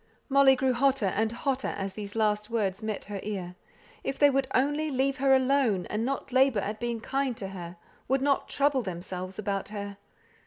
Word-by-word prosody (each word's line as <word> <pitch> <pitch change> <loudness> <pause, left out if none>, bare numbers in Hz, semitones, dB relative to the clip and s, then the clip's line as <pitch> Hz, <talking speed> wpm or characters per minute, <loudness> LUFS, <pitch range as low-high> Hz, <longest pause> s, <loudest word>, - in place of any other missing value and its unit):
Molly 275 -1 +6
grew 260 0 +1
hotter 265 -2 +2
and 220 +3 +1
hotter 265 +2 -1
as 195 -1 -3
these 205 0 -7
last 210 -1 +1
words 205 -4 -1
met 215 -2 -4
her 205 -1 -5
ear. 190 -4 -4 0.5
If 270 - -3
they 290 -1 +6
would 270 0 +1
only 290 +4 +1
leave 270 0 0
her 270 0 +4
alone, 260 -8 +2
and 210 +2 -1
not 270 +1 -3
labour 260 -5 +4
at 210 +2 -4
being 235 -1 -2
kind 270 -1 -1
to 195 - -5
her; 175 -2 -8 0.3
would 265 +1 +1
"not 280 -1 +1
trouble 280 -2 +2
themselves" 185 -1 -6
about 200 -2 -2
her! 200 -1 -6
230 Hz, 190 wpm, -28 LUFS, 200-270 Hz, 0.5 s, Molly